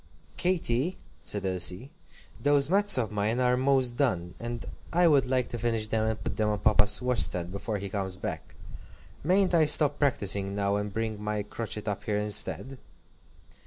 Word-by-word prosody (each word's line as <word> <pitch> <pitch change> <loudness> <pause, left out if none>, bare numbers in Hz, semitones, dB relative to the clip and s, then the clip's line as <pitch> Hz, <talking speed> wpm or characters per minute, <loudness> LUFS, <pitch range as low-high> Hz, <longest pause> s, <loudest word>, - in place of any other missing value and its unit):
"Katy," 175 -3 0 0.2
said 100 -2 -2
Elsie, 95 - 0 0.5
"those 145 +1 +3
mats 205 -2 +4
of 115 -4 -1
mine 105 +3 0
are 125 0 +3
most 130 -2 +1
done, 90 -11 0
and 120 0 -5 0.3
I 175 +1 +4
would 140 -5 +4
like 130 -1 0
to 120 - -5
finish 115 -2 0
them 110 0 0
and 110 - -4
put - - -4
them 110 -1 +1
on 105 - 0
Papa's 105 +2 +3
washstand 90 -8 0
before 100 +2 -4
he 100 0 -5
comes 95 -1 -4
back. - - -6 0.7
Mayn't 185 +4 +2
I 165 -2 +5
stop 150 -1 +4
practising 100 -8 +1
now, 100 0 0
and 105 0 -3
bring 110 0 -3
my 105 -1 -2
crochet 105 0 -5
up 105 -3 -4
here 105 -1 0
instead?" 105 +5 -2
115 Hz, 170 wpm, -28 LUFS, 105-135 Hz, 0.7 s, I